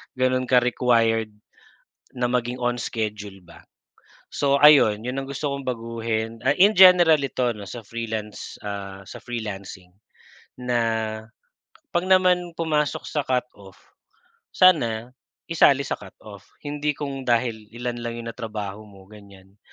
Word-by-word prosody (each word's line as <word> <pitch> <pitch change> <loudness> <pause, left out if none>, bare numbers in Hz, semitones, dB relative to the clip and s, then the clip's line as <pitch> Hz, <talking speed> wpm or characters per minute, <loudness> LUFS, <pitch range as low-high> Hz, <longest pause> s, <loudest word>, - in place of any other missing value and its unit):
ganun 130 0 0
ka-required 120 -3 +2 0.9
na 125 0 -1
maging 125 0 -2
on 120 0 0
schedule 105 -4 -5
ba. 85 -1 -16 0.7
So 140 -1 +2
ayun, 115 -8 +6
yun 125 +2 -3
ang 135 - -7
gusto 140 +1 -3
kong 140 -1 -5
baguhin, 115 -1 -3
ah, 135 +4 +1
in 200 +4 +6
general 180 -5 +7
ito 125 -3 -1
'no 100 -3 -10
sa 115 +1 -8
Freelance, 110 -2 -6
ah, 100 -1 -6
sa - - -9
Freelancing. 100 -6 -7 0.7
Na 125 -1 0 1.1
pag 175 +1 -1
naman 180 -2 +3
pumasok 155 -3 -1
sa 150 -3 -2
cut-off, 115 -7 -4 0.7
sana 120 -11 +3 0.4
isali 140 -4 +4
sa 140 - -3
cut-off. 100 0 -14 0.2
Hindi 150 0 -2
kung 135 -2 -6
dahil 115 -3 0
ilan 120 0 -4
lang 120 0 -5
yun 115 - -8
natrabaho 110 -3 -6
mo, 100 -1 -17
ganyan. 100 -2 -16
120 Hz, 130 wpm, -23 LUFS, 105-140 Hz, 1.1 s, general